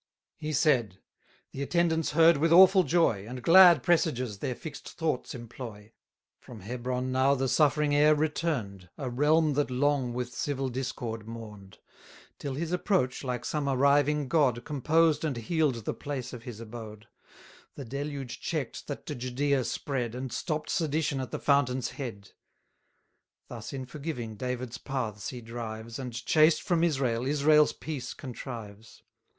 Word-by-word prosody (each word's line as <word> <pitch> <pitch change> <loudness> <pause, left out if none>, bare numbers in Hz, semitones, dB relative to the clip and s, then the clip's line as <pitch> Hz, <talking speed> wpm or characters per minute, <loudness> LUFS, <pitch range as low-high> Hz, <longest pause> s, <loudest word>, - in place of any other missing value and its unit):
790 150 - -4
He 155 - -2 0.4
said, 95 - -26 0.5
the 135 - -6
attendants 165 +1 +1
heard 165 0 +6
with 160 +3 +1
awful 190 +2 +8
joy, 165 - +2
And 125 +1 -7
glad 175 -5 +8
presages 130 - +1
their 125 - -3
fix'd 150 +1 -9
thoughts 160 -7 -3
employ; 115 -3 -9 0.5
From 115 -4 -12
Hebron 125 +4 -3
now 130 +2 +3
the 135 0 -1
suffering 150 +2 +2
heir 150 +1 +5
return'd, 145 - -2
A 130 -4 -4
realm 150 +4 +3
that 145 0 0
long 130 0 +1
with 125 0 -4
civil 135 0 -2
discord 120 -3 -4
mourn'd; 105 -5 -10 0.6
Till 140 -2 -4
his 165 +3 -3
approach, 180 -9 0
like 125 -2 -3
some 150 -2 -1
arriving 140 +2 +3
God, 130 -5 +2
Composed 155 +2 +2
and 150 -6 -1
heal'd 130 -2 0
the - - -1
place 135 -4 -5
of 120 - -7
his 120 -3 -7
abode; 110 -1 -9 0.7
The 140 - -7
deluge 140 0 -5
check'd 155 -7 -4
that 145 - -6
to 150 - -4
Judea 130 +2 0
spread, 125 -5 -3
And 130 -1 -5
stopp'd 155 -3 -3
sedition 155 -3 0
at 130 - -4
the - - -4
fountain's 130 -3 +1
head. 115 -8 -7 1.2
Thus, 115 -2 -7
in 130 -2 -5
forgiving, 125 -5 -6
David's 125 +1 -4
paths 115 -7 -4
he 125 -2 -7
drives, 115 0 -7
And, 125 -2 -5
chased 155 0 +4
from 170 -2 +1
Israel, 130 -7 0
Israel's 150 +1 +4
peace 135 -6 -6
contrives. 115 -5 -9
135 Hz, 150 wpm, -29 LUFS, 120-150 Hz, 1.2 s, awful